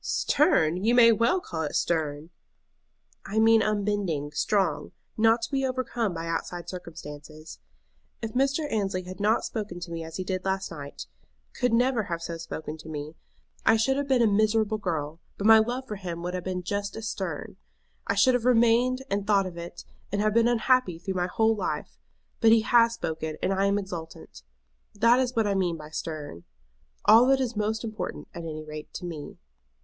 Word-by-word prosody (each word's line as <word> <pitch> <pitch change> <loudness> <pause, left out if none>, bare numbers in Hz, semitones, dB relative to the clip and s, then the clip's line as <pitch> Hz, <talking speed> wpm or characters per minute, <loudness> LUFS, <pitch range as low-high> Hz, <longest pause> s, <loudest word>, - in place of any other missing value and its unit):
"Stern! 180 - +2
you 235 +3 +3
may 230 -1 +8
well 230 - +2
call 170 - -5
it 150 - -3
stern." 155 -1 -1 0.9
"I 210 - -5
mean 225 0 +6
unbending, 205 -8 -1
strong, 175 -1 0 0.2
not 225 +1 +3
to - - -4
be 270 -1 0
overcome 255 -4 -1
by 165 0 -4
outside 165 +1 -4
circumstances. 155 -3 -9 0.6
If 225 -1 -5
Mr. 275 +4 +1
Annesley 195 -4 -1
had 185 0 -9
not 210 +3 +2
spoken 205 -6 -5
to 170 -1 -7
me 165 -1 -4
as 160 0 -7
he 185 - -3
did 185 0 -3
last 190 -1 -2
night, 145 -3 -8 0.5
could 250 -1 0
never 240 -1 +2
have 170 -2 -4
so 170 -1 -4
spoken 160 -1 -6
to 160 0 -11
me, 150 0 -6 0.5
I 225 - +5
should 265 +5 +2
have 280 0 -2
been 260 -3 +3
a - - +5
miserable 215 +1 +2
girl, 160 -4 -3 0.2
but 200 - -4
my 220 0 +8
love 245 +4 -1
for 210 - -5
him 175 -3 -6
would 180 +1 -3
have 180 -1 -4
been 185 -1 -3
just 200 +2 -3
as 225 0 -5
stern. 185 -8 -5 0.5
I 200 - +1
should 230 +6 +5
have 245 -1 0
remained 245 +1 +3
and 200 0 -2
thought 200 -2 +3
of 180 -2 -7
it, 170 0 -8 0.3
and 200 - -1
have 215 0 +2
been 230 +1 +4
unhappy 240 -5 +2
through 190 +3 -4
my 180 -1 0
whole 220 +4 +2
life. 210 - -4 0.4
But 225 -1 +5
he 225 0 +6
has 230 +1 +4
spoken, 160 -5 -4
and 195 - +2
I 195 +1 +2
am 200 +1 +2
exultant. 175 - -7 0.5
That 230 +4 +4
is 255 -1 -1
what 225 -1 +2
I 205 - +1
mean 180 -4 0
by 155 0 -11
stern. 150 - -6 0.6
All 225 +4 +7
that 270 0 +4
is 250 -3 -2
most 215 +2 -1
important, 220 -1 -5
at 170 - -6
any 155 -2 -6
rate 155 0 -9
to 180 - -5
me." 160 -4 -7
200 Hz, 195 wpm, -27 LUFS, 170-225 Hz, 0.9 s, may